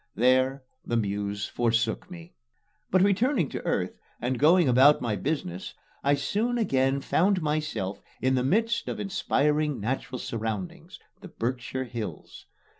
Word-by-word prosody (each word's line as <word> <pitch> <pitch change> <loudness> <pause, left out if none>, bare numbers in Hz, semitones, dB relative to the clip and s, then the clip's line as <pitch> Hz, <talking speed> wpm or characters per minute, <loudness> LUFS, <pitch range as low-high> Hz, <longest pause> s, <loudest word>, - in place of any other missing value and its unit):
There 130 +2 +3 0.2
the 120 - -1
Muse 100 -1 -2
forsook 115 +2 0
me. 170 -1 -11 0.6
But, 185 0 +4
returning 200 - +2
to - - -5
earth - - -1 0.2
and 125 0 -2
going 165 +2 +5
about 130 +4 +6
my 115 -4 -1
business, 115 - -3 0.3
I 140 +1 +4
soon 215 - -1
again 135 - +1
found 185 +4 +2
myself 150 -11 -2 0.2
in 130 +2 +1
the 125 -1 +1
midst 225 - +1
of - - -4
inspiring 150 -7 0
natural 130 +4 -3
surroundings 110 -6 -5 0.2
the - - -10
Berkshire 125 +2 -3
Hills. 115 -3 -7
135 Hz, 135 wpm, -27 LUFS, 120-165 Hz, 0.6 s, about